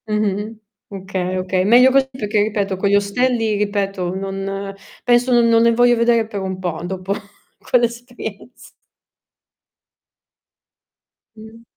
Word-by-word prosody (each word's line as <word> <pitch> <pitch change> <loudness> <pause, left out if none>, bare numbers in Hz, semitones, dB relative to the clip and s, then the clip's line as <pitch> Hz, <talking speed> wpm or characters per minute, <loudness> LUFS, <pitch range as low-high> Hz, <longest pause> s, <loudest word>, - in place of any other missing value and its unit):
Mh-mh. 210 +1 -2 0.3
Okay, 185 -1 -4
oka 185 0 0
Meglio 245 +6 +6
così, 265 0 +2
perché 210 -4 -1
ripeto 205 -2 -1
con 195 +2 0
gli 200 - +4
ostelli, 225 +2 +1
ripeto, 195 -3 -2
non 195 +1 -4 0.3
penso 245 +1 +3
non 240 -1 +4
non 230 0 +4
ne 235 0 +4
voglio 245 +1 +4
vedere 235 -1 +2
per 205 -3 -5
un 190 -1 -4
po' 175 -4 -4
dopo 185 +2 -3 0.5
quell'esperienz 240 -1 -3 2.7
Mh. 220 +1 -14
210 Hz, 120 wpm, -19 LUFS, 195-235 Hz, 2.7 s, Meglio